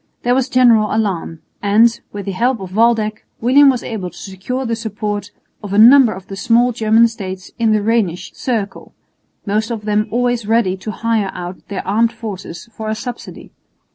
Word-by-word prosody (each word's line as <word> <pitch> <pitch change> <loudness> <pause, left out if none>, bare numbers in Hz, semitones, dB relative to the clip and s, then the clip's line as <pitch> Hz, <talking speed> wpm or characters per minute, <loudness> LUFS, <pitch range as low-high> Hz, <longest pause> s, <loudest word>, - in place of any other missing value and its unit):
There 245 - +2
was 265 +1 0
general 235 -4 +4
alarm; 190 -7 -2 0.2
and, 225 +3 +3
with 205 -1 -7
the 200 - -3
help 240 +5 0
of 190 -1 -8
Waldeck, 220 -2 +1 0.2
William 275 +4 +5
was 255 -3 0
able 195 -5 -5
to 175 - -17
secure 205 +7 -5
the 230 -1 -1
support 210 -2 -4 0.3
of 205 -2 -6
a - - +1
number 245 +2 +7
of 190 -1 -8
the 195 - -8
small 240 +3 +2
German 225 0 +3
states 190 -4 -7
in 225 -1 +2
the 215 -1 +1
Rhenish 210 -6 -1
circle, 225 -6 -4 0.5
most 215 +2 -1
of 225 -3 -5
them 210 0 +1
always 245 -2 -1
ready 225 -4 +2
to 190 +3 -8
hire 220 -2 -1
out 180 +1 -8
their 200 - -5
armed 225 +4 +2
forces 195 -4 -8
for 220 -1 -5
a 215 - -1
subsidy. 245 +2 -8
220 Hz, 185 wpm, -17 LUFS, 200-235 Hz, 0.5 s, number